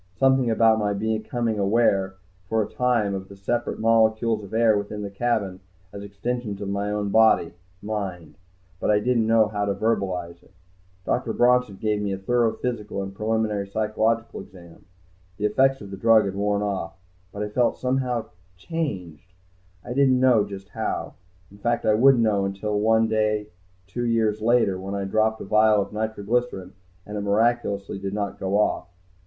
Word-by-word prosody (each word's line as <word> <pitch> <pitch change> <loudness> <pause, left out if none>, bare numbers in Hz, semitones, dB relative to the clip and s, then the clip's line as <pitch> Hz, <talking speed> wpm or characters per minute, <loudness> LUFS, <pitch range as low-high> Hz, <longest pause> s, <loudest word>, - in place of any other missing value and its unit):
Something 130 -1 +3
about 110 0 +4
my 105 -1 0
becoming 110 +2 -2
aware, 100 -2 +2 0.3
for 110 -1 +2
a - - -6
time, 120 -5 0
of 95 0 -5
the 100 - -11
separate 120 +5 -2
molecules 110 -1 +2
of 100 - -11
air 115 -1 +3
within 105 +1 -4
the 100 - -5
cabin 100 -3 -1 0.3
as 100 - -7
extensions 105 +1 -4
of 100 -1 -4
my 100 +1 -2
own 105 -1 -2
body 110 -5 +4 0.3
mind. 95 -7 -5 0.4
But - - -1
I 105 - +5
didn't 115 0 +1
know 110 -2 +4
how 105 -1 -2
to 100 -1 -1
verbalize 95 -6 -2
it. - - -25 0.5
Dr. 120 -2 -1
Bronson 125 -3 +3
gave 105 +1 -1
me 100 -1 -2
a - - -3
thorough 115 +3 +1
physical 105 -5 -4
and 95 - -6
a - - -19
preliminary 105 -1 -1
psychological 110 +2 -1
exam. 85 -4 -15 0.5
The 105 - -2
effects 135 +5 +2
of 100 -1 -9
the 95 - -6
drug 115 +1 +5
had 95 - -3
worn 100 +1 0
off, 100 -2 -3 0.3
but 100 - -4
I 105 - -4
felt 120 +3 +1
somehow 125 -2 -1 0.3
changed, 90 - -5 0.5
I 120 - -4
didn't 130 -1 +3
know 125 -5 +4
just 100 -1 -9
how. - - -4 0.4
In 100 - -16
fact 120 +2 -1
I 110 - +4
wouldn't 125 +2 +5
know 105 -3 +2
until 100 +2 -2
one 110 +1 +3
day 105 -1 0 0.4
two 120 +6 -3
years 110 -2 +1
later, 110 -5 +2
when 95 +1 -5
I 100 - -2
dropped 110 +3 0
a - - -6
vial 110 +1 +4
of 100 - -3
nitroglycerine, 110 -2 -2 0.3
and 105 0 -6
it - - -3
miraculously 100 -1 0
did 100 +1 -4
not 100 -2 -3
go 95 +1 0
off. 105 - 0
105 Hz, 180 wpm, -24 LUFS, 100-115 Hz, 0.5 s, I